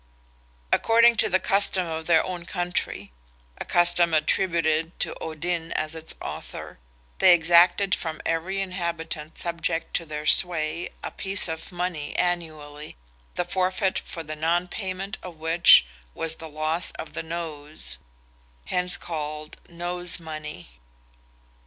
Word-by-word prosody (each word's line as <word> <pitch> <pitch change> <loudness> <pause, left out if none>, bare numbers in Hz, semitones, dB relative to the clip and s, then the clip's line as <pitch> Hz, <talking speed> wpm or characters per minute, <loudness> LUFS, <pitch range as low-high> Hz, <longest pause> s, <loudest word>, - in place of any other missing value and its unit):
According 230 0 +5
to - - +4
the 185 - +3
custom 195 -1 +1
of 160 -1 -5
their 165 -2 +4
own 180 -2 -5
country—a - - -5
custom 175 -1 +3
attributed 165 0 +1
to - - 0
Odin 165 +1 -3
as 155 0 -2
its 160 0 -3
author—they - - -1
exacted 175 +3 +5
from 160 -2 -2
every 180 +4 -1
inhabitant 170 -4 -4
subject 170 -1 -2
to 165 - -6
their 150 0 -5
sway—a 165 0 +1
piece 195 0 +4
of 160 -1 -5
money 175 -4 -3
annually, 155 - -3 0.4
the 175 - 0
forfeit 185 +1 0
for 165 - -7
the 155 0 -6
non 170 +3 +1
payment 195 +1 -4
of 180 -2 -9
which 160 - +7 0.3
was 160 0 -4
the 160 - -9
loss 155 +3 -1
of 160 - -8
the - - -3
nose, 155 - -6 0.7
hence 180 0 +2
called 155 -2 -5
"nose 175 +1 -3
money." 150 - -8
165 Hz, 125 wpm, -25 LUFS, 155-180 Hz, 0.7 s, which